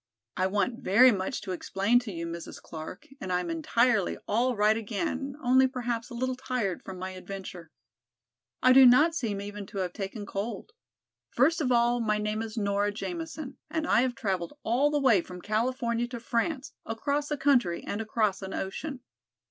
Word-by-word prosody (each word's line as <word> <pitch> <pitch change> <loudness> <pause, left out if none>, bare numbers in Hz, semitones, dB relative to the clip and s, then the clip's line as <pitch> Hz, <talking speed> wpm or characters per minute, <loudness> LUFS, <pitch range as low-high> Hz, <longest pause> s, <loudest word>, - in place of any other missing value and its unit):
"I 185 - +1
want 210 +5 0
very 250 +3 +6
much 200 +5 -2
to 195 - -5
explain 195 +6 +2
to 245 -4 -7
you, 170 -2 -4
Mrs. 170 0 -7
Clark, 160 -1 -8
and 185 - -5
I 180 - +2
am 175 -2 -3
entirely 220 +5 +2
all 245 +4 +1
right 210 +1 +4
again, 265 +5 -3
only 260 +1 +5
perhaps 245 -2 -3
a 240 - -8
little 255 +2 -1
tired 250 -7 -2
from 190 - -8
my 185 +1 -5
adventure. 185 -2 -8 0.9
I 255 - +7
do 265 0 +9
not 295 +7 +6
seem 225 -11 -2
even 205 0 -6
to 200 - -9
have 180 -2 -2
taken 205 +1 -5
cold. 205 - -5 0.6
First 315 +7 +2
of 255 -4 +1
all 240 0 +3
my 215 -2 +1
name 210 +1 -2
is 225 0 -6
Nora 205 -1 +1
Jamison 315 - -6
and 320 -1 -1
I 235 - +4
have 255 -1 0
traveled 190 +2 -3
all 255 +6 +2
the 295 - +1
way 245 -9 +4
from 180 +1 -10
California 235 +3 0
to 240 -1 -6
France, 255 +5 -2
across 285 +6 -2
a 295 - -1
country 245 -12 +2
and 205 - -3
across 215 -3 0
an 190 0 -5
ocean. 255 +8 -4
225 Hz, 185 wpm, -28 LUFS, 195-255 Hz, 0.9 s, do